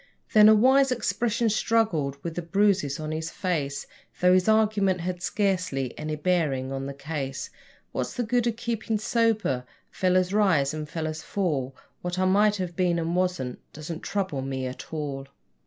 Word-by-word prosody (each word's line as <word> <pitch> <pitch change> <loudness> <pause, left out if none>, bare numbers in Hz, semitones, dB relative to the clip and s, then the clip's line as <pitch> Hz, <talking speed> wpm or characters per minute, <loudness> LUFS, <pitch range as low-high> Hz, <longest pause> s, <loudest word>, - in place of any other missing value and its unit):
Then 215 0 +8
a 220 - +8
wise 265 +4 +5
expression 235 -1 0
struggled 205 -11 +1
with 170 - -4
the 175 - -3
bruises 175 -5 +1
on 155 0 -4
his 160 +1 -3
face, 150 -7 -2 0.3
Though 180 0 +5
his 185 +3 +3
argument 210 -4 +3
had 180 0 -3
scarcely 180 - -1
any 155 0 -4
bearing 150 -6 0
on 135 0 -3
the 140 - -5
case: 140 -1 -5 0.4
'What's - - -3
the 245 - -1
good 240 +1 +1
o' - - +3
keepin' 230 -1 -2
sober? 215 - +1 0.3
Fellers 185 0 +1
rise 165 -10 +3
and 155 -1 -5
fellers 160 -2 -4
fall; 145 -11 -2 0.3
What 180 0 -3
I 185 - +2
might 205 +3 +4
have 180 -3 -4
been 180 -2 +1
and 165 +1 -1
wasn't 180 -9 -1
doesn't 155 +2 -6
trouble 190 -9 -2
me 130 -1 -3
at 125 0 -7
all.' 140 -3 -4
180 Hz, 170 wpm, -26 LUFS, 150-210 Hz, 0.4 s, Then